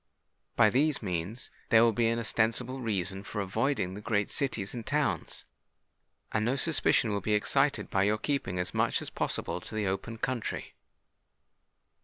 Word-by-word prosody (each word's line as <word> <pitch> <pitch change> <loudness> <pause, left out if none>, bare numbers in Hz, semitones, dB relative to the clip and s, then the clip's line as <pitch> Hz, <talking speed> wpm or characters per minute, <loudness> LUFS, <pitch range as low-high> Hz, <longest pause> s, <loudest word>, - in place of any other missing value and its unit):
By 110 -3 +5
these 145 +2 +2
means 95 +5 -4 0.2
there 115 -1 +7
will 115 - +5
be 115 +1 +1
an 115 +1 +1
ostensible 115 +3 0
reason 100 -4 -1
for 105 - -5
avoiding 100 0 0
the 105 - -7
great 105 -2 0
cities 115 -8 0
and 120 -2 -5
towns; 145 +4 -1 0.9
and 110 - +1
no 120 +4 +1
suspicion 140 -6 +2
will 100 -1 -1
be 105 +2 +1
excited 105 - +1
by 95 - +2
your 105 +1 +2
keeping 110 -7 -2
as 90 0 -2
much - - +1
as - - -6
possible - - -2
to - - -9
the 110 -1 0
open 100 +4 -3
country. 125 -1 -3
110 Hz, 165 wpm, -30 LUFS, 100-125 Hz, 0.9 s, there